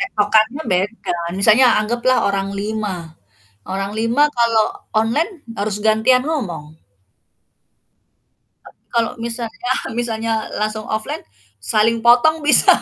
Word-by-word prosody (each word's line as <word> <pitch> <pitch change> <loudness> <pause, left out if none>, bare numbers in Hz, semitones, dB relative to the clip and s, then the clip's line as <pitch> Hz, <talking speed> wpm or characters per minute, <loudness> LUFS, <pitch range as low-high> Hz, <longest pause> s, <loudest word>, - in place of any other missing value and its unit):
Tektokkannya 220 - +1
beda. 190 0 -2 0.2
Misalnya 220 +6 +5
anggaplah 240 +4 0
orang 195 0 -2
5, 210 -2 -3 0.7
orang 195 +2 -3
5 230 +5 +1
kalau 230 -2 +3 0.3
onine 290 - 0 0.2
harus 205 0 -1
gantian 220 +4 +3
ngomong. 170 - -5 1.9
Tapi - - -18
kalau 230 -1 +1
misalnya 230 0 -3 0.3
misalnya 230 -1 -2 0.3
langsung 215 0 -3
offline 215 0 -4 0.4
saling 215 - +1
potong 295 +7 +4
bisa. 295 - +8
220 Hz, 105 wpm, -18 LUFS, 210-240 Hz, 1.9 s, bisa